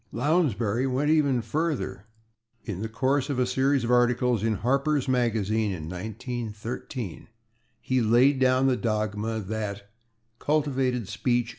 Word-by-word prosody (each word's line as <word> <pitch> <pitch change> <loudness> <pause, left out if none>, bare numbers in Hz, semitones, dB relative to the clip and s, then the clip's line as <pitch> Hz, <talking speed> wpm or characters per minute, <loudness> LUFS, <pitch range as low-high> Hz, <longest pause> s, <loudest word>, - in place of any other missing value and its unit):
Lounsbury 125 - +1
went 135 +4 +1
even 140 -6 +2
further. 115 - -2 0.6
In 100 -4 -4
the 110 - -3
course 135 +4 0
of 140 - -1
a 125 - +2
series 130 +1 +1
of 120 - -1
articles 120 -2 +3
in 110 -1 0
/Harper's 140 +5 +1
Magazine/, 110 -4 +1
in 85 -5 -5
1913, 110 +2 -6 0.5
he 130 +1 0
laid 125 +5 +4
down 130 0 +3
the 130 -1 +3
dogma 110 -1 -2
that 100 -1 -5 0.5
"cultivated 135 -6 0
speech 120 +2 0
120 Hz, 130 wpm, -26 LUFS, 110-135 Hz, 0.6 s, laid